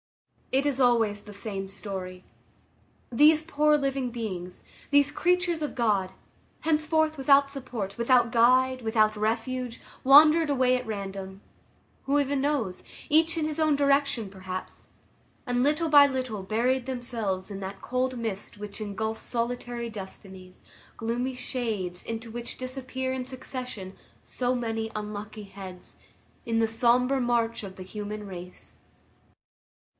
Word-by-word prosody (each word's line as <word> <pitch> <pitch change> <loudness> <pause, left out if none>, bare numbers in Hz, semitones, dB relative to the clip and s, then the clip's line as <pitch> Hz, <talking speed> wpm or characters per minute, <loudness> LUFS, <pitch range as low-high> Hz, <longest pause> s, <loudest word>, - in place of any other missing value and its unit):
It 270 +2 +2
is 275 -2 +1
always 225 -5 +3
the 210 - -11
same 200 -1 -5
story. 190 -2 -6 0.9
These 300 +5 +5
poor 300 -1 +3
living 275 -3 -1
beings, 190 -7 -5 0.3
these 285 0 +4
creatures 355 -2 +1
of 300 - -3
God, 205 -6 +1 0.5
henceforth 315 0 +2
without 275 +1 +5
support, 245 -8 -5
without 235 0 +3
guide, 255 +2 +4
without 220 -1 +2
refuge, 230 +3 -2 0.2
wandered 305 +4 +7
away 255 -2 +3
at 250 0 -3
random,—who 195 +7 -5
even 280 -1 0
knows?—each 295 - 0
in 315 - 0
his 310 0 -3
own 310 -2 +4
direction 280 -5 +2
perhaps, 185 -1 -7 0.6
and 245 -1 +1
little 305 +4 +2
by 290 -2 +8
little 255 -7 -3
buried 240 +5 +1
themselves 230 -7 -2
in 195 - -5
that 195 +1 -6
cold 255 0 -1
mist 215 -4 -5
which 205 +1 -7
engulfs 220 +2 -3
solitary 240 0 -3
destinies; 190 -3 -10 0.3
gloomy 245 +3 -2
shades, 220 -8 -3
into 230 0 -5
which 235 +1 -6
disappear 260 0 -4
in 260 -1 -2
succession 250 -6 -7 0.3
so 250 0 0
many 225 -2 -2
unlucky 210 0 -6
heads, 190 -2 -9 0.5
in 230 -1 0
the 225 - +3
sombre 250 +4 +3
march 235 -2 0
of 190 -2 -8
the 185 - -7
human 210 +2 -6
race. 180 -2 -11
240 Hz, 130 wpm, -27 LUFS, 205-265 Hz, 0.9 s, by